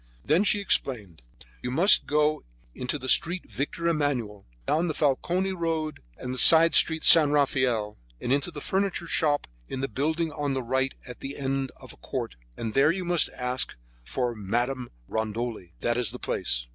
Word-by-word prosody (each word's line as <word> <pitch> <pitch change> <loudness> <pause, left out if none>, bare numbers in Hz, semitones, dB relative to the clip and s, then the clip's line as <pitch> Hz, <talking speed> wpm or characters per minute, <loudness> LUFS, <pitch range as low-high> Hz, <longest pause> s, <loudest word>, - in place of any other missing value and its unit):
Then 160 +7 +3
she 210 0 +1
explained: 110 - -1 0.4
"You - - -4
must 170 +11 +5
go 150 +1 +1 0.3
into 125 - -3
the 130 - -8
Street 175 +7 +2
Victor 170 +4 -3
Emmanuel, 130 -11 -2 0.2
down 165 - 0
the 155 - -3
Falcone 175 +7 0
road 165 -3 -3 0.2
and 125 0 -6
the 130 - -1
side 165 0 +8
street 160 -1 +5
San 155 -3 +8
Rafael 130 -7 0 0.2
and 125 - -1
into 140 +4 0
the 150 -4 -8
furniture 190 -1 -1
shop 150 -3 +1 0.2
in 130 - -5
the 135 - -1
building 155 +7 -2
at 145 -2 -2
the 130 - -3
right 130 +2 -1
at 125 -1 -10
the 140 +1 -7
end 135 -1 -2
of - - -12
a - - -20
court, - - -5 0.2
and 110 -2 -4
there 135 +2 +4
you 185 +1 -4
must 175 -1 +2
ask 125 0 -3 0.3
for 125 - -2
Madame 120 +5 -3 0.2
Rondoli. 110 -4 -4
That 120 0 0
is 120 - +1
the - - -6
place." - - -2
135 Hz, 180 wpm, -26 LUFS, 125-160 Hz, 0.4 s, side